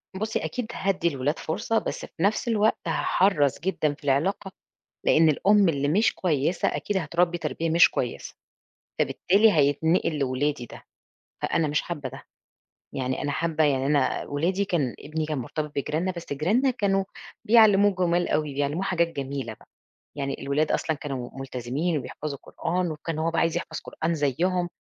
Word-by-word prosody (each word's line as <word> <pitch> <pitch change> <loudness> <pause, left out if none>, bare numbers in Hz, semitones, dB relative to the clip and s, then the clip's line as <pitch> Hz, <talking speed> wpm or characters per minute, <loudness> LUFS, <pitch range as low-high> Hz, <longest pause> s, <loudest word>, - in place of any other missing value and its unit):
بُصي 220 +3 -2
أكيد 250 -3 -3
هادي 190 -2 0
الولاد 145 -1 -1
فرصة 225 +8 -1
بس - - -3
في 165 - -6
نفس 215 +4 +1
الوقت 220 -1 +2
هاحرّص 160 -8 +2
جدًا 160 -4 0
في 150 - -19
العلاقة، 160 +8 0 0.5
لإن 160 0 +5
الأم 200 +5 +4
اللي 145 -2 0
مش 205 +10 +3
كويسة 165 -1 0
أكيد 205 - -1
هتربي 175 +1 +1
تربية 165 -1 -2
مش 165 +1 +6
كويسة، 120 - -4 0.6
فبالتالي 210 +3 +3
هيتنقل 155 +2 +2
لولادي 135 -1 -1
ده - - -12 0.6
فأنا 160 -2 +1
مش 150 +1 0
حابة 150 -6 -5
ده، 135 +1 -10 0.7
يعني 130 -1 -2
أنا 145 - -1
حابة 160 +1 +1
يعني 135 -2 +1
أنا 145 0 +1
ولادي 175 +7 0
كان 155 -10 -1
ابني 155 +1 -3
كان 155 -2 -2
مرتبط 150 +4 -4
بجيراننا 160 +6 -1
بس 170 -4 -7
جيراننا 205 - +2
كانوا 195 -5 +1 0.4
بيعلموه 205 -3 +6
جمال 175 -1 +1
أوي 150 -2 -1
بيعلموه 145 +5 -1
حاجات 175 -3 +1
جميلة 135 -6 -4
بقى، - - -23 0.5
يعني 140 -1 -3
الولاد 150 +3 0
أصلًا 160 - 0
كانوا 135 -4 -5
ملتزمين 135 +5 -2
وبيحفظوا 145 +1 -6
قرآن 175 +1 -2
وكان 155 +1 -5
هو 160 +1 0
بقى 165 - 0
عايز 165 -1 +1
يحفظ - - -4
قرآن 165 +1 -3
زيهم، 175 +5 0
160 Hz, 160 wpm, -26 LUFS, 145-185 Hz, 0.7 s, مش